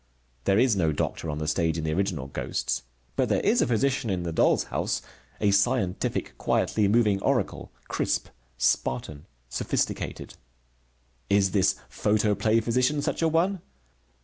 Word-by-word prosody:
There 95 - +3
is 125 -2 +4
no 85 -5 +2
doctor 80 +2 -2
on 75 - -3
the 75 0 -3
stage 80 +1 +1
in 80 - -3
the 80 0 -1
original 90 -6 -1
Ghosts. 70 - -2 0.3
But - - +1
there - - +2
is 225 +4 +3
a - - +2
physician 130 0 +1
in 90 -3 -1
the 85 - -3
Doll's 80 - +3
House, - - -1 0.4
a 105 -1 +3
scientific, 100 -2 0
quietly 105 -2 +1
moving 105 -2 +3
oracle, - - -1 0.2
crisp, - - -1 0.3
Spartan, 70 +4 -1 0.2
sophisticated. - - -2 1.0
Is 100 -1 +3
this 95 -2 +3
photoplay 110 +1 +1
physician 125 +6 +1
such - - -1
a 165 - +4
one? 170 +4 +1
100 Hz, 150 wpm, -26 LUFS, 85-120 Hz, 1.0 s, is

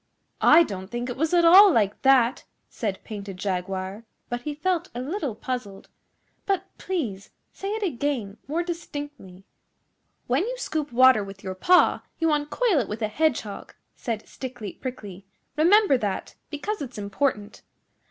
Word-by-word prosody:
'I 330 +3 +7
don't 190 - -6
think 240 +3 -4
it - - -5
was 315 +3 0
at 345 -1 +4
all 385 +4 +9
like 210 -8 +1
that,' 265 -2 +4 0.3
said 205 -5 -4
Painted 200 -3 -7
Jaguar, 190 +2 -3 0.3
but 240 0 -3
he 295 +3 -4
felt 350 +3 -1
a - - -3
little 285 - -3
puzzled; 220 -5 -6 0.6
'but, 390 -2 0
please, 235 - -3 0.2
say 390 - -5
it 440 - -3
again 255 - -2
more 325 +5 -1
distinctly.' 290 - -7 0.8
'When 260 +7 +1
you - - -4
scoop 310 -11 -3
water 255 -2 +6
with 195 0 -10
your 190 -1 -4
paw 355 - +4 0.2
you 325 -1 +1
uncoil 300 - +1
it 230 - -2
with 220 +2 -4
a 215 - 0
Hedgehog,' 235 -5 -2 0.2
said 225 -3 -4
Stickly 245 -7 -7
Prickly. 205 -7 -8 0.3
'Remember 345 - +5
that, 200 -4 -3 0.2
because 320 +8 -4
it's 260 -4 -6
important. 210 +1 -2
255 Hz, 150 wpm, -25 LUFS, 205-320 Hz, 0.8 s, all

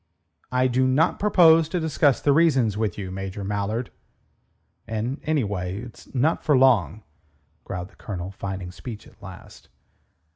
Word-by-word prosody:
"I 125 0 +2
do 130 +1 +2
not 135 +5 +2
propose 165 -6 +5
to 180 - -1
discuss 150 -4 +2
the 145 - +3
reasons 135 -9 +3
with 105 -4 -2
you, 95 -3 -5
Major 95 +1 -5
Mallard." 105 +4 -2 1.0
"And, 115 +6 -3
anyway, 105 -12 -1
it's 120 -1 -12
not 150 +6 +1
for 150 -4 +3
long," 110 - +3 0.6
growled 90 0 -5
the - - -24
Colonel, 95 -4 -6
finding 95 -2 -6
speech 110 +3 -9
at - - -20
last. 95 -3 -12
115 Hz, 145 wpm, -24 LUFS, 95-140 Hz, 1.0 s, propose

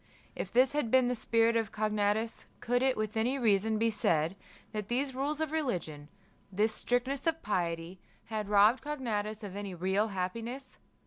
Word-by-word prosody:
If - - -4
this 255 +2 +4
had 295 -6 0
been 255 0 +4
the - - +1
spirit 230 -1 +2
of 225 -2 0
Cognatus, 215 +1 0
could 245 +1 +1
it 260 -1 +2
with 215 0 -2
any 240 +5 +1
reason 220 -2 +2
be 225 +1 +2
said, 165 -4 +1 0.4
that 210 -2 -4
these 265 +3 -1
rules 285 +4 -2
of 315 -1 -1
religion, 175 - -3 0.4
this 210 +3 +1
strictness 255 +6 -1
of 325 0 0
piety, 170 -2 -2 0.3
had 215 -2 -4
robbed 210 +4 +5
Cognatus 220 -7 -3
of 200 -2 -6
any 200 -2 -5
real 190 +5 +1
happiness? 230 +7 -5
220 Hz, 170 wpm, -31 LUFS, 205-255 Hz, 0.4 s, robbed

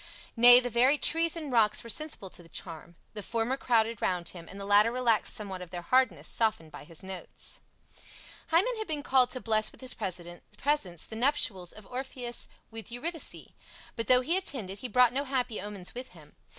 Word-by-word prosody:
Nay, 245 +1 +9
the 245 -1 -3
very 255 +6 +4
trees 330 +2 +3
and 310 -4 -6
rocks 220 -3 +3
were 230 - -10
sensible 300 -11 -2
to - - -10
the 165 - -17
charm. 170 0 -8 0.2
The 210 - -6
former 230 +4 -1
crowded 230 -4 0
round 175 -2 -1
him 170 -2 -9
and 195 - -10
the 200 - -6
latter 205 +3 +5
relaxed 240 -3 +1
somewhat 195 -3 -5
of 180 - -9
their 175 0 -7
hardness, 220 - +2
softened 215 -9 0
by - - -11
his 165 +2 -11
notes. 190 -1 -5 0.9
Hymen 395 +9 +2
had 435 - -4
been 300 -3 -3
called 255 -2 +4
to 255 - -4
bless 215 -2 +2
with - - -17
his 255 -1 +1
presence 180 - -3
the 220 - -9
nuptials 225 -8 0
of 215 - -13
Orpheus 250 0 -4 0.2
with 225 0 -8
Eurydice; 320 +7 -2 0.5
but 230 - -4
though 250 0 +5
he 320 +7 0
attended, 215 - -4
he 250 - -5
brought 250 +1 +4
no 275 +2 -1
happy 260 -6 -2
omens 200 -3 -6
with 250 +1 -8
him. - - -17
230 Hz, 195 wpm, -29 LUFS, 190-260 Hz, 0.9 s, Nay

